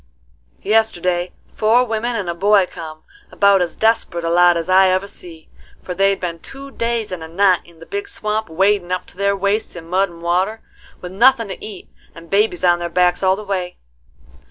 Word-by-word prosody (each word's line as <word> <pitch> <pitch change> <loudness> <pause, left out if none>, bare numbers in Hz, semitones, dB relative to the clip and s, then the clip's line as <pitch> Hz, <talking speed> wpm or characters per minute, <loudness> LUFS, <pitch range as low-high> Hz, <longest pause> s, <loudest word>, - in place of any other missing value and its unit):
Yesterday 180 -5 +1 0.2
four 225 +3 +3
women 235 +1 -2
and 200 -5 -3
a 170 - -1
boy 200 +2 +3
come: 155 -3 -10 0.3
about 200 -2 +4
as 175 -2 -2
desperate 220 -6 0
a 165 - 0
lot 175 0 +5
as 165 - -4
I 190 +1 +5
ever 185 +2 0
see; 170 -5 -12 0.4
for 180 - -5
they'd 195 +2 +1
been 170 -2 -4
two 275 +8 -10
days 230 -4 -2
and 180 -3 -5
a 160 - -7
night 185 +2 +2
in 170 -1 -19
the 165 - -13
big 405 0 -5
swamp, 215 - -3
wadin' 190 +2 +1
up 185 - -2
to - - -17
their 200 0 +1
waists 200 +2 -1
in 165 -1 -9
mud 190 +2 +1
and 170 0 -14
water, 185 +6 0 0.4
with 180 - -7
nothin' 230 +2 +3
to 190 - -8
eat, 205 -4 -9 0.3
and 165 0 -14
babies 200 -3 +1
on 175 -1 +4
their 175 0 -4
backs 180 0 +2
all 190 0 +3
the 215 - -8
way. 185 -3 -4
190 Hz, 205 wpm, -19 LUFS, 175-215 Hz, 0.4 s, lot